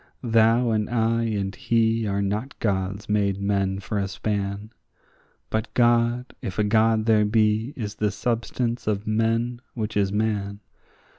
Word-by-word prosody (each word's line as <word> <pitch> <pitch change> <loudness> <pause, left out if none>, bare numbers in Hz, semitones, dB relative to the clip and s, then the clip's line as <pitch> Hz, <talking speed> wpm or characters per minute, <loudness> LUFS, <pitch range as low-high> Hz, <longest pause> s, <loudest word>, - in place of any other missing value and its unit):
Thou 115 +1 +3
and 105 -1 0
I 115 0 +1
and 100 -3 -2
he 115 -1 +1
are 100 0 0
not 105 +7 -3
gods 100 -1 -2
made 100 -2 +1
men 100 -1 0
for 100 +1 -3
a 100 - -1
span, 100 +1 -3 0.8
But 110 +1 -2
God, 120 +1 +2
if 95 - -5
a 105 - +2
God 110 +1 +3
there 110 -2 +4
be, 110 +2 +2
is 105 -4 -4
the 105 -1 0
substance 120 +2 -2
of 105 -1 -1
men 115 +2 0
which 110 -2 -3
is 100 -2 +1
man. 105 -1 -1
110 Hz, 150 wpm, -24 LUFS, 100-115 Hz, 0.8 s, there